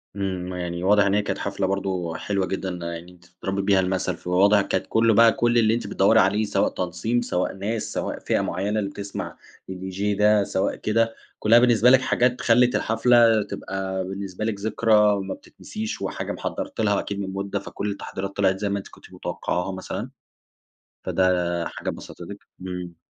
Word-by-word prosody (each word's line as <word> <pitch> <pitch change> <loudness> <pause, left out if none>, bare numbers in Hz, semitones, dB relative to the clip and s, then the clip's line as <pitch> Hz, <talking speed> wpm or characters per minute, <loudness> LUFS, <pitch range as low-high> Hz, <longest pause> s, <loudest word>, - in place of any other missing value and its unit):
إمم، 95 -2 -3
يعني 90 -1 -4
واضح 100 +1 +4
إن 100 - +2
هي 105 - +3
كانت 105 - -3
حفلة 100 -1 -2
برضه 95 -4 -2
حلوة 100 -2 -1
جدًا 95 0 -3
يعني 85 0 -6
أنتِ 90 -1 -20
تضربي 95 +3 -4
بيها 100 -1 +3
المثل، 95 0 -1
فواضح 100 +3 +3
كانت 100 - -1
كل 115 0 +3
بقى 115 +2 +7
كل 120 +1 +1
اللي 110 -1 +4
أنتِ 120 - -2
بتدوري 95 - +4
عليه 100 +4 +3
سواء 100 -1 +1
تنظيم 90 +7 -1
سواء 90 -6 -1
ناس 105 +3 -3
سواء - - -3
فئة - - 0
معينة 100 +5 -1
اللي 100 -2 -2
بتسمع 100 0 -6 0.3
الDJ 95 +1 -6 0.2
ده، 105 0 +4
سواء 95 - -1
كده، 115 +1 0 0.2
كلّها 115 +2 +6
بالنسبة 120 -1 +5
لكِ 130 0 +6
حاجات 125 -1 +1
خلِّت 125 +1 +4
الحفلة 115 -1 +4
تبقى 95 -1 -4
بالنسبة 95 +1 -5
لكِ 110 -3 -2
ذكرى 105 -1 +3
ما 95 0 -4
بتتنسيش، 110 0 -7
وحاجة - - -3
محضرتلها 105 -2 -2
أكيد 100 -1 -4
من 95 -1 -4
مدة، 100 +1 -3
فكل 100 +1 -4
التحضيرات 100 0 -6
طلعت 95 -1 +2
زي 105 0 -1
ما 100 - 0
أنتِ 95 - -10
كنتِ - - -17
متوقعاها 90 +2 -3
مثلًا، 95 +5 -5 0.9
فده 90 -2 +1
حاجة - - -5
بسطتِك؟ - - -8 0.2
إمم. 90 -2 -6
100 Hz, 175 wpm, -24 LUFS, 95-110 Hz, 0.9 s, بقى